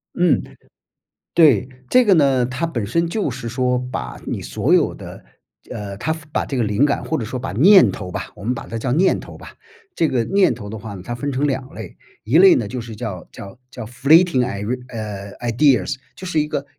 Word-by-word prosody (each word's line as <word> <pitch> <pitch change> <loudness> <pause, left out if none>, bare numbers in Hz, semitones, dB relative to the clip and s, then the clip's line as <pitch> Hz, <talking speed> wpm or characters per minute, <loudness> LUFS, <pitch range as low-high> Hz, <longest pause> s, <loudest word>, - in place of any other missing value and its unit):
嗯， 175 -7 +2 0.9
对， 140 - +5 0.2
这 255 0 +5
个 195 - +6
呢， 135 -6 +3
它 130 +7 -3
本 120 -10 -3
身 170 +10 0
就 195 -3 -1
是 120 -1 -6
说 125 +1 0
把 60 -1 -5
你 - - -3
所 - - -1
有 - - +3
的， - - -10 0.5
呃， 100 -1 -6
它 160 +8 -1 0.2
把 - - -1
这 135 - -4
个 120 - +1
灵 105 +6 +2
感 145 - -1
或 160 - -2
者 115 - -3
说 125 +4 -5
把 130 +2 -5
念 185 - +6
头 95 -3 -7
吧， - - -6
我 - - -13
们 125 +3 0
把 120 - -8
它 115 - -5
叫 125 +3 -3
念 180 +7 +2
头 - - -11
吧， - - -12 0.4
这 165 - +1
个 120 -5 0
念 195 -9 +2
头 105 -3 -9
的 110 - -6
话 105 -1 -8
呢， 95 - -9
它 120 - -4
分 145 +4 -3
成 135 +3 0
2 135 -1 -3
类， 110 -5 -9 0.3
1 125 +9 +2
类 190 +1 +8
呢 115 - -1
就 125 +5 -5
是 115 -1 -9
叫 95 -4 -6
叫 100 +2 -11
叫 125 -3 -8
flating 140 +5 +3
i， 100 -4 -5 0.3
呃， 105 -4 -6
ideas， 135 +3 +2 0.2
就 185 - -8
是 160 -4 0
一 150 - -1
个， 150 -2 -3
125 Hz, 265 characters per minute, -20 LUFS, 110-150 Hz, 0.9 s, 类